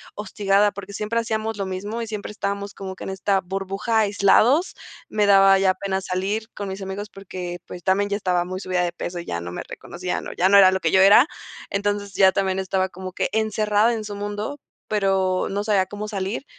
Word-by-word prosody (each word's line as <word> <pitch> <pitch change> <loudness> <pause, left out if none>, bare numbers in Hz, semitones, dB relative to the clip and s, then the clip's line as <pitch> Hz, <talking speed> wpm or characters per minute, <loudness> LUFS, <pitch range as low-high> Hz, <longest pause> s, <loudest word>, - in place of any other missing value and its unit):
hostigada, 205 0 +1
porque 200 0 -9
siempre 215 +3 -1
hacíamos 220 -1 -2
lo 195 -2 -3
mismo 205 +5 -4
y 230 - -4
siempre 210 -1 -5
estábamos 200 -1 -4
como 190 -1 -7
que - - -10
en 195 - -4
esta 195 +1 +1
burbuja, 195 +4 -1
aislados. 215 - +3 0.4
Me 210 -1 +1
daba 195 -1 +6
ya 190 -1 +3
pena 190 -1 -2
salir 195 +4 -2
con 200 -1 -5
mis 190 +1 -6
amigos 195 +2 -5
porque, 180 -2 -7
pues, 175 - -9
también 200 +2 +2
ya 200 - 0
estaba 180 -3 0
muy 185 +1 -5
subida 185 -1 -1
de 175 -1 -2
peso 175 0 -5
y 170 - -7
ya 85 0 -3
no 85 - -6
me - - -5
reconocían 180 +1 -5
o - - -6
ya 185 +2 +2
no 200 - +7
era 190 -1 +8
lo 190 - 0
que 165 - 0
yo 190 - +5
era. 205 +8 +7 0.4
Entonces, 205 0 -2
ya 190 -1 +6
también 190 -1 0
estaba 190 0 0
como 185 0 -8
que - - -1
encerrada 215 +1 +2
en 220 -1 -3
su 205 - -6
mundo, 205 +7 -4 0.3
pero 195 -3 +1
no 200 +1 -1
sabía 205 -3 +2
cómo 205 +2 -6
salir. 200 +5 -3
195 Hz, 215 wpm, -23 LUFS, 190-210 Hz, 0.4 s, era